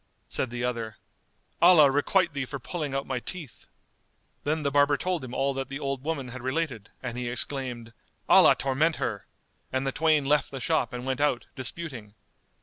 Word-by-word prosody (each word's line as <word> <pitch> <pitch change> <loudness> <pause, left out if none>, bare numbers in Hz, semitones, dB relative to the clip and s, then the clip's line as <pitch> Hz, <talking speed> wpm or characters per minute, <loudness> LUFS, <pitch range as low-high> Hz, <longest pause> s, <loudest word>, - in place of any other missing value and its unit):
Said 130 - -1
the 120 0 -4
other, 115 -3 -3 0.6
"Allah 170 -5 +8
requite 170 +4 +2
thee 140 -2 -2
for 140 +2 -5
pulling 145 +1 -4
out 135 - -1
my 130 -2 -2
teeth." 155 -1 -7 0.8
Then 155 +1 0
the 140 - 0
barber 145 0 +4
told 180 -2 -2
him 125 - -7
all 140 0 +1
that 135 0 -4
the 135 +1 -5
old 135 -2 -3
woman 145 -5 -3
had 130 +1 -8
related 130 -5 -2
and 125 -1 -4
he 120 -1 -2
exclaimed, 125 -2 -3 0.3
"Allah - - +7
torment 145 +5 +1
her!"; 100 -3 -3 0.4
and 130 +1 -1
the 135 - 0
twain 155 -1 +2
left 145 +2 +2
the 135 - -6
shop 160 +5 0
and 125 0 -6
went 130 +1 -1
out, 145 -5 +1
disputing. 130 -6 -5
135 Hz, 185 wpm, -27 LUFS, 125-150 Hz, 0.8 s, Allah